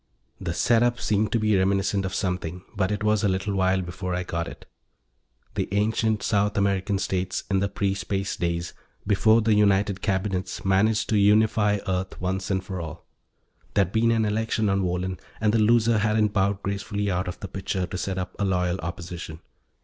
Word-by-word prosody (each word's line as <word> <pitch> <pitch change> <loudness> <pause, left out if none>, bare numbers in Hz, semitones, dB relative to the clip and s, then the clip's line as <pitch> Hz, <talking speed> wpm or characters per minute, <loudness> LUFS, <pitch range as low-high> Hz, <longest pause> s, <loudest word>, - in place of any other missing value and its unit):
The 85 -3 -3
setup 120 +3 +3
seemed 105 0 +1
to 115 - +2
be 110 -1 +2
reminiscent 95 +1 +1
of 95 - -3
something, 90 -1 -2
but 95 -1 0
it 105 0 -2
was 105 -1 +2
a - - +4
little 95 +2 -1
while 95 -1 +2
before 90 +1 -4
I 90 - -2
got 85 -1 -3
it: - - -10 0.9
the - - -2
ancient 110 +1 +1
South 105 0 +1
American 100 0 +1
states, 95 -1 -2
in 95 - +3
the 100 +1 0
pre 100 -1 0
Space 100 0 -2
days, 85 0 -2 0.3
before 110 +2 +4
the 110 0 +3
United 100 -1 +2
Cabinets 95 -1 -2
managed 105 +3 +2
to 110 - +3
unify 105 0 +4
Earth 95 0 -2
once 95 +1 -2
and 95 -2 0
for 95 -2 -5
all. 80 0 -8 0.7
There'd 95 -3 +2
been 115 +2 +2
an 115 -1 +2
election 110 0 0
on 100 0 +1
Wohlen 90 0 -2 0.2
and 110 -1 +2
the 115 - +3
loser 115 0 +4
hadn't 105 0 +2
bowed 100 0 +1
gracefully 100 0 -2
out 90 +1 -1
of 90 - -5
the 100 - -6
picture 95 0 -3
to 90 - -7
set 95 +1 -3
up 90 -1 -4
a - - +1
Loyal 90 -1 0
Opposition. 85 -2 -6
100 Hz, 190 wpm, -25 LUFS, 95-105 Hz, 0.9 s, a